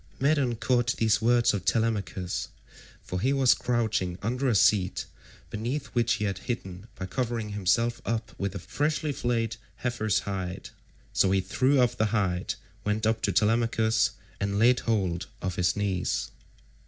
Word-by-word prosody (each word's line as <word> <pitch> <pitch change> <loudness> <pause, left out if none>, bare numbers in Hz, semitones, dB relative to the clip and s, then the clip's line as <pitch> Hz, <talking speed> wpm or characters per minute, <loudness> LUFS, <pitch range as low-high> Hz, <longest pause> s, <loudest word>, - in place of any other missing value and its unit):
Medon 140 -4 +2
caught 120 +2 +1
these 110 -1 +2
words 120 +1 +4
of 100 -3 -2
Telemachus, 100 -5 -1 0.6
for 90 - -4
he 130 - +2
was 135 -2 +5
crouching 110 -7 -1
under 125 +5 0
a 115 - +2
seat 95 -2 +3 0.5
beneath 125 +7 -2
which 120 -1 +2
he 105 - -1
had 100 -2 -2
hidden 95 -4 -5
by 95 - -5
covering 115 +1 -2
himself 105 +4 +1
up 115 -1 -2
with 100 0 -2
a - - -1
freshly 145 - -1
flayed 115 -4 -1 0.2
heifer's 115 -5 0
hide, 95 -2 -4 0.4
so 95 - +3
he 95 0 +3
threw 130 +9 +2
off 120 -1 +3
the 110 - +1
hide, 95 -5 0 0.3
went 105 +1 0
up 110 0 +1
to - - +1
Telemachus, 115 0 +2 0.3
and 100 0 -1
laid 120 +3 +5
hold 95 -6 -1
of 95 -3 -3
his 90 0 +1
knees. 95 -11 -1
110 Hz, 155 wpm, -27 LUFS, 95-120 Hz, 0.6 s, was